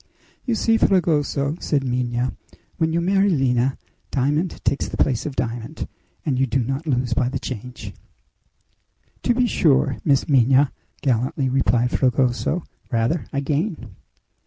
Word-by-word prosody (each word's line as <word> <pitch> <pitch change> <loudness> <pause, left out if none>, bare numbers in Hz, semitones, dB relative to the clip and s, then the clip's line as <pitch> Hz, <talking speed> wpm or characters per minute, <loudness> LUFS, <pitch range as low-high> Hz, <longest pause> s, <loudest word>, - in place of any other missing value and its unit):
"You 240 - +2
see, 225 +1 +3
Fragoso," 155 -6 +1
said 145 -3 0
Minha, 125 -1 -1 0.4
"when 160 -1 +1
you 165 - +1
marry 195 +3 +3
Lina, 130 -5 +1 0.3
diamond 150 +6 0
takes 140 - +1
the - - -6
place 130 -2 +1
of 140 - -5
diamond, 120 +4 -4 0.4
and 135 -5 0
you 135 - +2
do 125 +1 +1
not 135 +6 -3
lose 125 -3 +1
by 125 +1 +1
the - - -2
change!" 125 0 -7 1.3
"To 240 - +1
be 250 0 +3
sure, 150 - +2
Miss 140 -3 +2
Minha," 135 0 +4 0.3
gallantly 130 +1 +1
replied 125 -2 +2
Fragoso; 130 +6 +1 0.3
"rather 120 +8 0
I 140 - -1
gain!" 145 - -2
135 Hz, 140 wpm, -22 LUFS, 125-155 Hz, 1.3 s, Minha